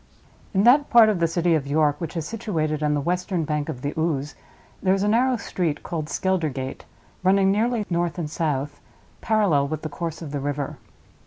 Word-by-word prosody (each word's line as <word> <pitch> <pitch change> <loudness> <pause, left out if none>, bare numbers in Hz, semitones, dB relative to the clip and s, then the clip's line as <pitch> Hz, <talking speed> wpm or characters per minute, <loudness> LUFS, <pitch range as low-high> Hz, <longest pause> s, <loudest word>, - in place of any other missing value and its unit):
In 195 - +4
that 275 +5 +5
part 230 -2 +7
of 205 -5 0
the 170 - +3
city 170 +1 +1
of 145 -3 0
York 150 +2 +1
which 165 0 -4
is 160 - -2
situated 160 -9 -2
on 150 -1 +1
the 145 - 0
western 180 0 -1
bank 150 -1 -2
of 125 - -6
the 145 - -2
Ouse 150 -3 -1 0.5
there 190 0 +3
is 195 - -1
a - - +1
narrow 245 +4 +3
street, 170 -7 -2
called 155 -3 -4
Skeldergate, 155 -9 -2 0.4
running 190 +1 +4
nearly 225 +1 +1
north 175 0 -1
and 170 -3 -2
south, 145 -3 -2 0.4
parallel 195 -11 +2
with 155 +1 -4
the 155 - -3
course 165 +1 -5
of 150 - -7
the 145 - -2
river. 145 0 -3
165 Hz, 195 wpm, -24 LUFS, 150-195 Hz, 0.5 s, part